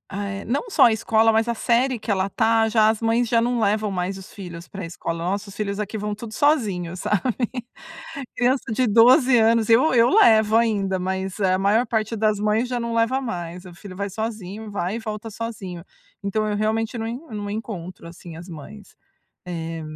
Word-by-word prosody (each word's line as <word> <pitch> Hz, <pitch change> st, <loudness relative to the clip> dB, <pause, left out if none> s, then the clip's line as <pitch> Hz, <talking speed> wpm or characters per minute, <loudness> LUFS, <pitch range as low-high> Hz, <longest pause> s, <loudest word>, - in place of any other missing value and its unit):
ah, 200 Hz, 0 st, -3 dB
eh, 195 Hz, 0 st, -6 dB
não 280 Hz, -, -2 dB
só -, -, +5 dB
a 225 Hz, -, +3 dB
escola, 220 Hz, +1 st, +3 dB
mas 225 Hz, +1 st, +2 dB
a 235 Hz, -, -1 dB
série 245 Hz, +3 st, +1 dB
que 220 Hz, -, -3 dB
ela 190 Hz, 0 st, 0 dB
tá, 225 Hz, +2 st, +2 dB
já 215 Hz, -1 st, +4 dB
as 220 Hz, 0 st, -1 dB
mães 230 Hz, +1 st, +2 dB
já 230 Hz, -1 st, +3 dB
não 240 Hz, 0 st, 0 dB
levam 210 Hz, 0 st, +1 dB
mais 185 Hz, 0 st, -2 dB
os 190 Hz, +2 st, -12 dB
filhos 175 Hz, -4 st, -9 dB
pra 195 Hz, -3 st, -7 dB
escola. 165 Hz, 0 st, -5 dB
Nossa, 200 Hz, +3 st, -2 dB
os 195 Hz, -, -12 dB
filhos 200 Hz, -1 st, -3 dB
aqui 210 Hz, +1 st, -3 dB
vão 210 Hz, 0 st, -3 dB
tudo 220 Hz, +1 st, -8 dB
sozinho, 205 Hz, -, +1 dB
sabe. 195 Hz, +2 st, 0 dB, 1.1 s
Criança 250 Hz, 0 st, +1 dB
de 255 Hz, +1 st, +1 dB
12 245 Hz, +4 st, +6 dB
anos 225 Hz, 0 st, +3 dB
eu 255 Hz, +7 st, +5 dB
eu 235 Hz, -1 st, +5 dB
levo 220 Hz, -, +5 dB
ainda, 205 Hz, -5 st, +1 dB
mas 190 Hz, +1 st, -3 dB
a 185 Hz, -2 st, +2 dB
maior 210 Hz, +5 st, +3 dB
parte 220 Hz, 0 st, -1 dB
das 215 Hz, -1 st, +1 dB
mães 215 Hz, +3 st, +1 dB
já 245 Hz, -, -1 dB
não 235 Hz, 0 st, -3 dB
leva 230 Hz, +4 st, +1 dB
mais, 180 Hz, -6 st, -5 dB
o 180 Hz, -, -11 dB
filho 185 Hz, +1 st, -11 dB
vai 200 Hz, +1 st, -3 dB
sozinho, 215 Hz, 0 st, -5 dB
vai 200 Hz, +1 st, -2 dB
e -, -, -3 dB
volta 215 Hz, 0 st, -6 dB
sozinho. 205 Hz, -6 st, -6 dB, 0.4 s
Então 215 Hz, +2 st, -1 dB
eu 210 Hz, -, -1 dB
realmente 220 Hz, +2 st, -1 dB
não 225 Hz, 0 st, -3 dB, 0.2 s
não 205 Hz, -1 st, -5 dB
encontro, 190 Hz, -6 st, -6 dB
assim, 170 Hz, 0 st, -11 dB
as 175 Hz, -, -10 dB
mães. 190 Hz, +6 st, -11 dB, 0.5 s
Eh, 165 Hz, -1 st, -5 dB
215 Hz, 200 wpm, -23 LUFS, 195-230 Hz, 1.1 s, 12